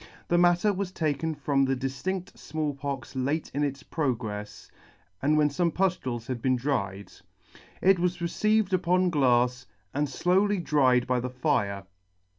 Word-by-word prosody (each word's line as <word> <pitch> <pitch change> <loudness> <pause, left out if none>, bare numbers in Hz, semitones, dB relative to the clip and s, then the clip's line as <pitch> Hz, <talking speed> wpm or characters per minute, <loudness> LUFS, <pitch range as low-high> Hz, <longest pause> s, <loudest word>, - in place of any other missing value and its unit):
The 175 - +3
matter 175 +4 +4
was 190 -1 -3
taken 160 -1 -1
from 140 -1 +1
the 135 0 +1
diftinfft 140 +9 -4
Small 155 -1 -3
Pox 140 -2 -5
late 140 +5 -1
in 145 +2 0
its 140 -1 -3
progrefs, 110 -10 -4 0.5
and 150 +2 +3
when 150 -1 +4
fome 170 +4 0
puftules 140 -11 -1
had 120 -1 -4
been 130 +1 +2
dried. 105 -7 -2 0.7
It 190 -1 +5
was 175 0 0
received 215 +3 +1
upon 180 0 +2
glafs, 125 -3 +2 0.3
and 145 +1 0
flowly 190 +8 +2
dried 130 -7 +3
by 125 -1 +1
the 125 +1 -3
fire. 120 - -1
145 Hz, 150 wpm, -27 LUFS, 125-175 Hz, 0.7 s, It